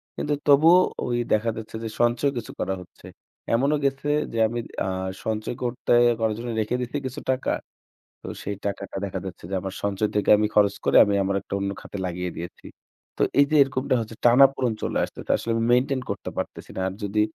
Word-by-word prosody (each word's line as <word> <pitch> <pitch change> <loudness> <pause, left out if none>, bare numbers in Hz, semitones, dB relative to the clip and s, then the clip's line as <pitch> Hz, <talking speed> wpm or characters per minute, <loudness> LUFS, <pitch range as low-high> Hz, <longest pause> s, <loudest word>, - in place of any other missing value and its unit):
কিন্তু 150 - -1
তবুও 160 +5 +7 0.3
ঐদেখা 120 -2 0
যাচ্ছে 110 0 -8
যে 110 - -3
সঞ্চয় 120 +4 +2
কিছু 115 - -5
করা 95 - -1
হচ্ছে। 90 - -16 0.5
এমনও 140 +5 +2
গেছে 135 +1 -1 0.3
যে - - -3
আমি 120 +2 -3 0.3
আ - - -2 0.4
সঞ্চয় 110 +2 -2
করতে 120 0 0 0.3
করার 110 -1 +1
জন্য 120 +1 -5
রেখে 110 +3 0
দিয়েছি 125 +3 -3
কিছু 130 +3 -5
টাকা। 130 - -1 0.7
তো - - -8 0.2
সেই 100 0 -4
টাকাটা 100 -1 -4
দেখা 95 - -4
যাচ্ছে 90 -2 -9
যে - - -2
আমার 95 0 -5
সঞ্চয় 100 +1 0
থেকে 105 - +2
আমি 105 0 +2
খরচ 100 -1 +4
করে - - +3
আমি 100 -1 0
আমার 100 0 0
একটা - - -7
অন্য 100 0 -1
খাতে 100 - -8
লাগিয়ে 90 0 -3
দিয়েছি। 85 +1 -8 0.5
তো - - 0 0.2
এই 140 - +8
যে 155 - +3
এরকমটা 130 -1 0
হচ্ছে 115 0 -7
টানা-পোড়ণ 130 0 +5
চলে - - -1
আসতেছে। - - -9
আসলে 115 - -3
আমি 115 0 0
মেইনটেইন 130 +1 +2
করতে - - -4
পারতেছি - - -5
না। - - -2
আর 95 - -6
যদি 105 +1 0
115 Hz, 195 wpm, -24 LUFS, 100-130 Hz, 0.7 s, এই